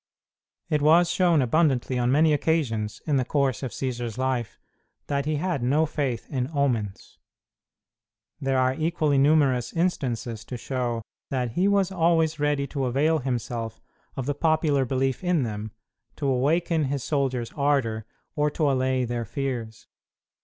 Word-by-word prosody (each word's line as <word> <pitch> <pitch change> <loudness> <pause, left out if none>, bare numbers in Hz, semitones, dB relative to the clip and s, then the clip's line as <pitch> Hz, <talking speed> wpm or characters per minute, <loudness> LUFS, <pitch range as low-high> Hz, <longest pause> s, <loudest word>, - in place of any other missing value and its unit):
It 150 -3 0
was 165 +4 +5
shown 170 -6 +3
abundantly, 130 -2 +1
on 120 +1 +2
many 155 +2 +4
occasions 135 -9 -1
in 150 -3 +2
the 130 - +2
course 135 -2 0
of 130 - -3
Cćsar's 120 -1 -4
life, 130 -4 -2 0.5
that 140 0 -1
he 155 - +1
had 165 -2 -1
no 145 +6 +2
faith 140 -6 -3
in 130 -1 -1
omens. 115 -8 -1 1.2
There 135 -1 0
are 130 0 +3
equally 155 -2 +1
numerous 135 -5 +3
instances 125 -10 -1
to 125 - -6
show 120 -2 -2 0.3
that 125 -3 -1
he 180 - +1
was 200 -2 +2
always 165 -3 +2
ready 145 -1 +1
to 140 -1 -3
avail 150 +6 +2
himself 120 -3 -3 0.4
of 130 - -3
the 145 - 0
popular 155 -2 +2
belief 130 +4 -1
in 175 -5 +2
them, 110 -1 -4 0.5
to 145 - -4
awaken 155 +5 +1
his 135 -1 -2
soldiers' 130 -5 -1
ardor 130 -7 0 0.3
or 150 0 +2
to 145 -1 +1
allay 130 -1 +1
their 120 0 -2
fears. 115 -4 -4
135 Hz, 150 wpm, -25 LUFS, 125-155 Hz, 1.2 s, was